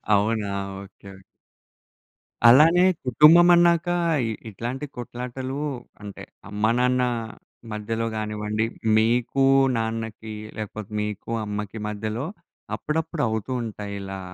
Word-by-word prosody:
అవునా? 105 0 0 0.3
ఓకే. 100 0 -14 1.4
అలానే 160 +9 +7 0.2
కుటుంబం 155 +7 +7
అన్నాక 170 0 +4 0.6
ఇట్లాంటి 120 +7 -5
కొట్లాటలు 125 +2 -5 0.4
అంటే 100 -1 -9 0.3
అమ్మ, 105 +1 -5
నాన్న 125 +1 +2 0.7
మధ్యలో 110 +2 -3
గానివ్వండి, 105 0 -2 0.3
మీకు 120 +4 +2 0.3
నాన్నకి 110 -1 -4 0.2
లేకపోతే, 110 -1 -6
మీకు 105 +1 -5
అమ్మకి 105 +1 -5
మధ్యలో 110 +4 -3 0.5
అప్పుడప్పుడు 155 0 -2
అవుతూ 110 +3 -3
ఉంటాయి 105 -2 -6
ఇలా 95 0 -6
110 Hz, 90 wpm, -24 LUFS, 105-125 Hz, 1.4 s, అలానే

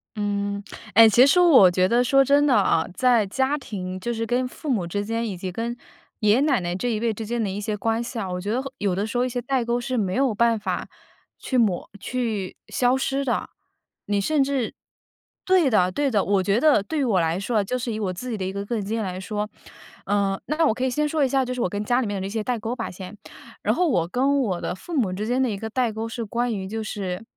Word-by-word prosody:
嗯， 200 -1 -2 0.3
哎， 225 +3 +9
其 235 +4 +6
实 285 +6 +4
我 275 - +7
觉 185 +1 +2
得 240 +4 +3
说， 275 +2 +4
真 285 +2 +4
的 280 - +3
啊， 160 -9 +3
在 245 -1 +3
家 265 +8 0
庭， 185 -8 -6
就 235 +6 -3
是 230 0 -2
跟 245 +2 0
父 290 +4 -7
母 215 -9 +1
之 205 +4 -3
间 230 +2 -2
以 195 -4 -5
及 185 +1 -4
跟 230 +4 -3 0.4
爷 210 -2 +3
爷 250 - +3
奶 285 -4 +3
奶 175 -1 -3
这 245 +7 -2
一 215 - -1
辈 230 0 0
之 220 +1 -6
间 235 +2 -2
的 210 - -1
一 195 +2 -4
些 210 0 -2
关 225 +3 0
系 235 -1 -5
啊， 195 - -3
我 180 0 -3
觉 205 +3 -3
得 245 +3 0
后 270 0 -8
有 200 -3 0
的 200 +4 -1
时 230 - -3
候 245 - +2
一 - - -2
些 245 0 -3
代 265 0 0
沟 235 +1 0
是 255 +1 -3
没 190 -4 0
有 260 -4 +1
办 230 0 +2
法 190 -4 -3 0.5
去 260 - -2
抹 210 -7 +1
去 220 -5 -3
消 250 +1 +2
失 270 +1 -1
的。 255 - -1 0.6
你 205 -1 0
甚 295 +6 +2
至 270 -4 -1 0.7
对 370 -7 +4
的 185 -5 +3
对 285 +2 0
的。 210 -4 +3
我 195 -1 +2
觉 200 +4 +2
得 295 -8 +4
对 310 +9 -3
于 - - +2
我 200 -7 +2
来 165 +2 0
说 215 +3 0
啊， - - +1
就 250 +6 -2
是 235 -2 -3
以 - - -3
我 200 -4 -1
自 215 +8 -6
己 225 - -3
的 190 - -4
一 190 - -2
个 200 +1 -5
个 235 - -3
人 215 - -2
经 210 +3 -3
验 225 - -1
来 185 -2 -4
说 210 +2 -4 0.6
呃， 200 -1 0
那 310 +2 +1
我 255 - +3
可 250 - -4
以 260 - +2
先 300 +4 0
说 300 0 +1
一 265 - +2
下， 265 0 +2
就 250 - -3
是 250 - -3
我 185 - +1
跟 205 +2 -3
家 245 +3 +2
里 235 - -2
面 200 -2 -3
的 190 - -3
这 - - -5
些 215 +1 -2
代 245 +1 -1
沟 225 +3 -3
吧， 230 -3 -4
先。 185 +3 -9 0.4
然 - - +1
后 360 - +2
我 180 - +2
跟 275 +5 +2
我 190 -8 -1
的 - - -3
父 340 - -10
母 205 -9 +1
之 205 +3 -3
间 250 +3 0
的 260 - +2
一 205 - -3
个 220 +2 -5
代 245 +1 0
沟 220 +1 -4
是 230 0 -4
关 240 +3 -1
于 190 -2 -4
就 220 +2 -4
是 195 -2 -4
225 Hz, 300 characters per minute, -24 LUFS, 200-255 Hz, 0.7 s, 哎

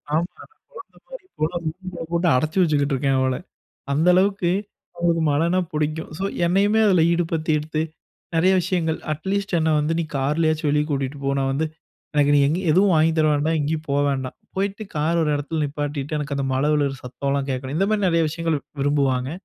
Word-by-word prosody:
ஆமா. 165 +2 +2 0.5
கொழந்த - - -12
மாரி - - -10
கொண்டு 155 +3 0
வந்து 170 -2 -2
வீட்டுக்குள்ளே 180 -1 -8
போட்டு 170 +1 +1
அடைச்சி 155 +7 -1
வச்சுக்கிட்டு 145 -4 +2
இருக்கேன் 135 0 +1
அவள. 130 -1 +1 0.6
அந்த 155 +5 +2
அளவுக்கு 190 -1 +2 0.5
அவளுக்கு 170 -1 +1
மழைன்னா 170 +5 +2
புடிக்கும். 155 +1 -2
ஸோ, 190 - -4 0.2
என்னையுமே 200 +5 +3
அதில 180 -5 +4
ஈடுபடுத்திட்து 160 -2 0 0.5
நெறைய 175 +4 +4
விஷயங்கள். 170 -3 -1
அட்லீஸ்ட் 190 +5 -2
"என்ன 160 0 +1
வந்து 150 +2 0
நீ - - -1
கார்லயாச்சும் 155 +3 +1
வெளியே 150 +1 +2
கூட்டிகிட்டு 140 0 -2
போ. 140 - +1
நான் 135 0 0
வந்து 155 +4 0 0.5
எனக்கு 145 -1 +3
நீ 145 - +5
எங்கேயும் 175 +4 -1
எதுவும் 190 +3 +4
வாங்கித் 160 +1 +3
தர 155 - +4
வேண்டாம், 150 +3 +1
எங்கேயும் 155 +2 -2
போக 140 +1 +2
வேண்டாம். 130 -2 -3 0.2
போயிட்டு 200 +2 -2
கார் 160 +3 +1
ஒரு 155 - +1
இடத்துல 145 +2 -2
நிப்பாட்டிட்டு, 145 0 -3
எனக்கு 145 -1 -3
அந்த 140 - -1
மழை 135 +3 +1
விழுகிற 140 -2 0
சத்தம்லாம் 140 +2 -2
கேட்கணும்" 130 +2 -3
இந்த 195 - +2
மாதிரி 205 -3 +2
நெறைய 165 -1 +2
விஷயங்கள் 165 -1 -1 0.2
விரும்புவாங்க. 135 -2 +1
155 Hz, 180 wpm, -22 LUFS, 145-170 Hz, 0.6 s, நீ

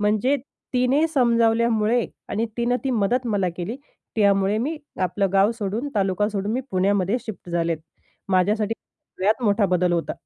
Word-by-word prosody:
म्हणजे 215 +7 +2 0.4
तिने 255 +5 +3
समजावल्यामुळे 235 -2 +3 0.2
आणि 225 +3 -1
तिनं 240 +1 +1
ती 270 - 0
मदत 240 +2 +1
मला 200 -5 +1
केली. 190 +7 -4 0.4
त्यामुळे 200 -1 +3
मी 290 +8 -2 0.3
आपलं 185 +2 +1
गाव 195 +2 +4
सोडून, 215 +6 -2
तालुका 195 0 +1
सोडून, 205 0 -2
मी 250 - 0
पुण्यामध्ये 195 +2 +1
शिफ्ट 200 -5 -8
झालेत. 170 -1 0 0.5
माझ्यासाठी 210 +4 +2 0.4
सगळ्यात 215 +6 +1
मोठा 205 -1 +3
बदल 180 -1 +2
होता. 170 -1 -1
210 Hz, 145 wpm, -23 LUFS, 195-235 Hz, 0.5 s, गाव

